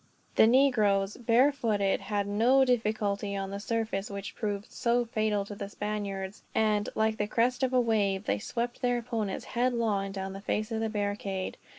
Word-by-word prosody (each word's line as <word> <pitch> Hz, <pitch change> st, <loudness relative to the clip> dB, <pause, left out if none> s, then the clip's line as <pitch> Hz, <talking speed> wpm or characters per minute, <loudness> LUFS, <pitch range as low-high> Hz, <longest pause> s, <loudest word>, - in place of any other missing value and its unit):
The 220 Hz, -, +7 dB
negroes, 215 Hz, -6 st, +3 dB
barefooted, 230 Hz, -4 st, +2 dB
had 205 Hz, -1 st, -1 dB
no 235 Hz, +7 st, +4 dB
difficulty 215 Hz, -4 st, 0 dB
on 195 Hz, 0 st, -4 dB
the 200 Hz, -, -4 dB
surface 220 Hz, -2 st, -2 dB
which 200 Hz, -1 st, -6 dB
proved 205 Hz, -2 st, -4 dB
so 240 Hz, 0 st, +1 dB
fatal 215 Hz, -3 st, 0 dB
to 205 Hz, -, -7 dB
the 200 Hz, 0 st, -6 dB
Spaniards; 205 Hz, -2 st, -4 dB
and, 215 Hz, -2 st, +2 dB
like 220 Hz, 0 st, +1 dB
the 210 Hz, -, -1 dB
crest 245 Hz, +4 st, +1 dB
of 260 Hz, -1 st, +1 dB
a 255 Hz, -, +4 dB
wave, 210 Hz, -5 st, +1 dB
they 100 Hz, +1 st, 0 dB
swept 240 Hz, -, -3 dB
their 245 Hz, -1 st, +2 dB
opponents 225 Hz, -4 st, -3 dB
headlong 230 Hz, -5 st, 0 dB
down 190 Hz, -1 st, -5 dB
the 195 Hz, -, -8 dB
face 215 Hz, +2 st, -2 dB
of 225 Hz, -, -1 dB
the 225 Hz, 0 st, -1 dB
barricade. 205 Hz, -2 st, -3 dB
215 Hz, 175 wpm, -29 LUFS, 200-235 Hz, -, The